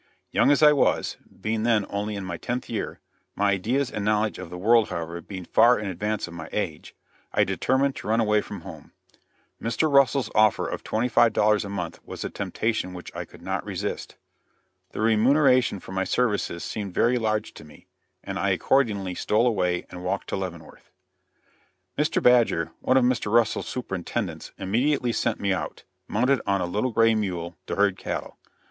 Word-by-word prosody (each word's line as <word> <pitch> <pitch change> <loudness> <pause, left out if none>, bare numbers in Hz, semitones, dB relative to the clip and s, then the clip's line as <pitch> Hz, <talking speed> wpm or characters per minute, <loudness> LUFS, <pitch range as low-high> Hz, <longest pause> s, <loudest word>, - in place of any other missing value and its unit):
Young - - +3
as 145 +2 +4
I 150 0 +8
was 140 - +1 0.2
being 110 0 -1
then 110 -3 +2
only 105 +1 -3
in 100 -1 -5
my 90 -2 -4
tenth 120 +8 -4
year, 110 - -4 0.4
my 100 0 +2
ideas 120 +8 0
and 105 - -3
knowledge 105 -1 +1
of - - -7
the 90 - -7
world, 115 +4 +4
however, 85 +1 -4
being 95 0 -8
far 120 +7 +5
in 105 - -4
advance 105 +3 -2
of 85 - -10
my 80 -1 -8
age 80 -8 -4 0.4
I - - +3
determined 135 +1 +1
to - - -7
run 110 +2 +2
away 105 -2 +3
from 100 -3 -8
home. - - -11 0.7
Mr. 115 +7 0
Russell's 140 -3 +4
offer 110 -1 +3
of - - -5
twenty 115 +3 0
five 120 -1 +4
dollars 105 0 +3
a 100 - -6
month 90 -4 -4
was - - -7
a - - -4
temptation 110 -5 -2
which 90 - -10
I - - -4
could - - -16
not - - -2
resist. - - -4 0.7
The - - -5
remuneration 125 +1 +4
for - - -11
my 95 0 0
services 105 -6 0
seemed 100 -4 -5
very 125 +1 +3
large 110 -1 -1
to - - -12
me, 75 -1 -16 0.4
and - - -4
I - - +1
accordingly 105 -9 +1
stole 110 +6 +1
away 90 -7 +1
and 90 0 -8
walked 90 - -2
to - - -1
Leavenworth. - - -7 1.1
Mr. 150 +1 0
Badger, 120 -9 +4
one 130 - +2
of 130 - +4
Mr. 120 -4 0
Russell's 115 -1 +2
superintendents, 95 -8 -4
immediately 125 +5 +1
sent 115 -1 0
me 100 -1 +1
out, 85 -5 -5 0.2
mounted 125 +4 +2
on 100 0 +2
a 90 - 0
little 105 +8 -1
gray 115 0 +4
mule, 90 -6 -2
to - - -2
herd 100 -2 +2
cattle. - - -5
110 Hz, 185 wpm, -25 LUFS, 95-120 Hz, 1.1 s, I